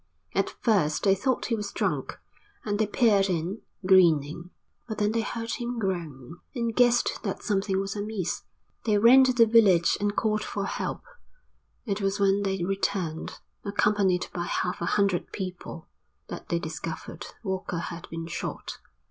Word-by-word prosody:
At - - +1
first 185 -10 +2
they 195 - +5
thought 255 +7 0
he 230 - 0
was 205 -2 -4
drunk - - -2 0.5
and 205 -1 -1
they 215 - +2
peered 205 -3 +3
in, 180 +4 -2 0.2
grinning, 170 -3 +4 0.4
but 220 - -5
then 210 0 +1
they 225 0 +1
heard 230 +1 -4
him 240 0 -3
groan, 170 - -4 0.2
and 235 -2 -1
guessed 245 - +3
that - - -4
something 195 -2 0
was 195 +1 -3
amiss. 205 -3 -3 0.4
They 215 -2 +3
ran 240 +5 +8
to 255 - +3
the 240 -2 +5
village 210 -7 +5
and 205 0 0
called 215 -1 +1
for 200 -1 -3
help. - - -3 0.8
It 205 -2 -2
was 195 +1 0
when 200 0 +3
they 195 -2 -1
returned, 190 -4 -2 0.3
accompanied 200 -3 +2
by 175 -1 -2
half 180 0 -2
a 170 - -1
hundred 200 -3 +1
people, 180 -4 -6 0.4
that - - -8
they 170 - +1
discovered 160 -1 -6 0.2
Walker 190 -3 -3
had 170 0 -6
been 165 0 -5
shot. 165 - -5
195 Hz, 160 wpm, -27 LUFS, 175-215 Hz, 0.8 s, ran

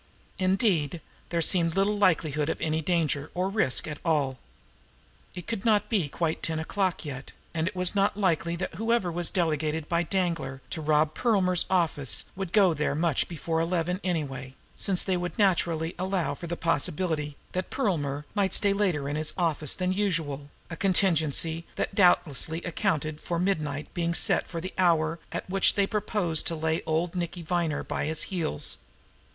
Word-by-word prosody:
Indeed, 185 - +1 0.3
there 170 -1 +1
seemed 165 -1 +3
little 200 +2 +2
likelihood 155 -6 +2
of - - -2
any 160 0 0
danger 155 -4 0
or 185 +2 0
risk 195 - +1
at 150 -2 -5
all. 145 -6 +1 1.0
It 180 -2 -7
could 225 -4 -3
not 215 -3 +2
be 190 -10 +1
quite 160 +2 -2
ten 160 -1 -1
o - - -2
clock 185 -1 -1
yet; 135 -2 -7 0.2
and 165 0 0
it 185 - -4
was 180 -1 +2
not 200 0 +1
likely 170 -4 +1
that 185 +2 -4
whoever 225 -1 0
was 175 0 +1
delegated 155 -2 -1
by 170 0 +1
Danglar 170 -7 -1
to 160 - -3
rob 155 0 +2
Perlmer's 190 -7 +2
office 165 -7 +2
would 190 -2 -4
go 195 -5 +5
there 150 -1 -1
much 160 -2 +1
before 165 -1 -2
eleven 175 +1 0
anyway, 135 -7 -3 0.2
since 190 -3 +2
they 190 - +1
would 175 +4 -4
naturally 170 -5 +1
allow 185 -5 0
for 170 +4 -7
the 170 +1 -3
possibility 150 -1 0 0.2
that 185 0 -3
Perlmer 150 - -1
might 195 -3 +2
stay 200 -2 +3
later 180 -9 0
in 145 - -2
his 155 0 -3
office 160 -5 +1
than 185 0 0
usual, 160 -8 -1 0.2
a - - -3
contingency 165 -4 +2
that - - -2
doubtless 175 - +3
accounted 160 -2 -2
for 170 - -2
midnight 155 -5 -1
being 170 -1 -1
set - - +2
as 165 -2 -4
the 185 - -5
hour 165 -2 +2
at - - -4
which 195 +1 +3
they 200 - +3
proposed 200 -6 0
to 165 - -1
lay 160 +1 0
old 165 +2 0
Nicky 175 -1 -4
Viner 170 -3 -1
by - - -3
the 160 - -2
heels. 165 - -1
170 Hz, 175 wpm, -27 LUFS, 155-185 Hz, 1.0 s, go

